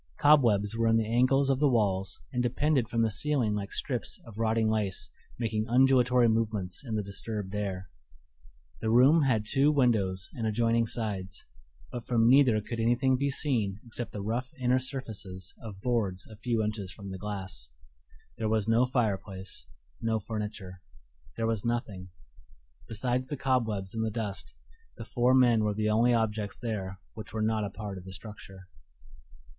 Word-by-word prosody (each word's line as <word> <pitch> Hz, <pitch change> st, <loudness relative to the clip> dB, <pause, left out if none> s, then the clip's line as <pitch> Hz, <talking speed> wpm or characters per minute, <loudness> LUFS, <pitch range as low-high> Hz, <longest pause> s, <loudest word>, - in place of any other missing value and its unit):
Cobwebs 115 Hz, -8 st, +4 dB
were 115 Hz, 0 st, +1 dB
in 115 Hz, 0 st, +4 dB
the 110 Hz, -, +1 dB
angles 130 Hz, +4 st, +3 dB
of 135 Hz, -, 0 dB
the 145 Hz, -1 st, +4 dB
walls 100 Hz, -6 st, 0 dB
and 125 Hz, -, +1 dB
depended 130 Hz, 0 st, +1 dB
from 115 Hz, -1 st, +1 dB
the 110 Hz, -, +1 dB
ceiling 130 Hz, -2 st, +1 dB
like 100 Hz, -1 st, -4 dB
strips 125 Hz, -5 st, -1 dB
of 115 Hz, -2 st, -11 dB
rotting 110 Hz, 0 st, +2 dB
lace 105 Hz, -3 st, -1 dB, 0.3 s
making 110 Hz, -2 st, -1 dB
undulatory 125 Hz, -1 st, +4 dB
movements 110 Hz, -4 st, -1 dB
in 115 Hz, -5 st, -4 dB
the 105 Hz, -, -1 dB
disturbed 100 Hz, 0 st, -4 dB
air. 95 Hz, -3 st, -3 dB, 0.9 s
The 110 Hz, -, -2 dB
room 130 Hz, +8 st, +6 dB
had 120 Hz, -7 st, +2 dB
two 135 Hz, +7 st, +3 dB
windows 105 Hz, -10 st, +1 dB
in 115 Hz, -3 st, -2 dB
adjoining 115 Hz, +1 st, +2 dB
sides, 100 Hz, -4 st, -4 dB, 0.5 s
but 120 Hz, -, -6 dB
from 115 Hz, -2 st, +3 dB
neither 125 Hz, -4 st, +5 dB
could 115 Hz, +2 st, -6 dB
anything 120 Hz, +3 st, +3 dB
be 140 Hz, +2 st, 0 dB
seen 115 Hz, -9 st, -1 dB
except 120 Hz, 0 st, -5 dB
the 105 Hz, -, -5 dB
rough 120 Hz, +4 st, -2 dB
inner 125 Hz, 0 st, +3 dB
surfaces 110 Hz, -9 st, -5 dB
of 105 Hz, -4 st, -8 dB
boards 100 Hz, -7 st, -1 dB
a 110 Hz, -, -12 dB
few 115 Hz, 0 st, -1 dB
inches 105 Hz, -3 st, -3 dB
from 100 Hz, -1 st, -9 dB
the 95 Hz, -, -6 dB
glass. 95 Hz, -12 st, -6 dB, 0.7 s
There 110 Hz, -1 st, 0 dB
was 110 Hz, -1 st, +1 dB
no 115 Hz, +3 st, +4 dB
fireplace, 100 Hz, -, -3 dB, 0.3 s
no 115 Hz, -1 st, +1 dB
furniture; 105 Hz, -4 st, -6 dB, 0.6 s
there 115 Hz, -, 0 dB
was 115 Hz, -3 st, 0 dB
nothing: 110 Hz, -6 st, -3 dB, 0.8 s
besides 125 Hz, +3 st, -1 dB
the 145 Hz, -, -4 dB
cobwebs 110 Hz, -8 st, 0 dB
and 110 Hz, 0 st, -1 dB
the 110 Hz, -, 0 dB
dust, 105 Hz, -3 st, -5 dB, 0.4 s
the -, -, -7 dB
four 125 Hz, +1 st, +2 dB
men 120 Hz, -4 st, +5 dB
were 105 Hz, -1 st, 0 dB
the 110 Hz, 0 st, +1 dB
only 115 Hz, +3 st, +4 dB
objects 110 Hz, -3 st, 0 dB
there 95 Hz, -5 st, -4 dB, 0.2 s
which 110 Hz, -1 st, -9 dB
were 110 Hz, -1 st, -1 dB
not 110 Hz, 0 st, +1 dB
a -, -, -3 dB
part 100 Hz, -1 st, -6 dB
of 90 Hz, -, -14 dB
the 95 Hz, -, -9 dB
structure. 95 Hz, -2 st, -10 dB
110 Hz, 170 wpm, -29 LUFS, 100-120 Hz, 0.9 s, room